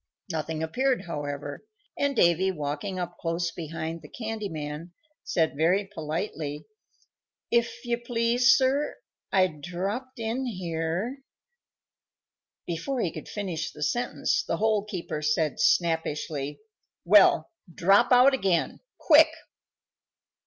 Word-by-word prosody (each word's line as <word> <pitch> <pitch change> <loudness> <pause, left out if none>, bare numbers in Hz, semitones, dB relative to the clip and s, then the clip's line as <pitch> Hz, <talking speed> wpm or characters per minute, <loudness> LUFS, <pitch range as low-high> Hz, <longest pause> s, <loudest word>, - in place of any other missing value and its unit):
Nothing 160 0 -3
appeared, 250 +7 0
however, 145 - -5 0.3
and 280 -1 0
Davy, 175 +2 +4
walking 150 +3 -3
up 175 -1 -5
close 165 0 -1
behind 165 0 -5
the 150 - -13
candy 220 -3 -4
man, 155 +2 -6 0.3
said 160 -4 0
very 175 +7 +2
politely, 160 -4 -4 0.9
"If 235 +2 0
you 240 0 0
please, 240 +1 +3
sir, 275 +3 +1 0.3
I 190 -1 +5
dropped 190 - -4
in 235 +3 -2
here" 180 - -3 1.5
Before 175 +11 -3
he 170 - 0
could 155 - -8
finish 185 -6 -3
the 150 - -6
sentence 240 +10 0
the - - -2
Hole 215 -2 +1
keeper 175 -6 -4
said 150 -1 0
snappishly, 150 -3 0 0.4
"Well, 180 -4 +6 0.2
drop 195 +9 +4
out 250 +2 +7
again 190 -10 0 0.2
quick!" - - +7
175 Hz, 115 wpm, -27 LUFS, 160-230 Hz, 1.5 s, out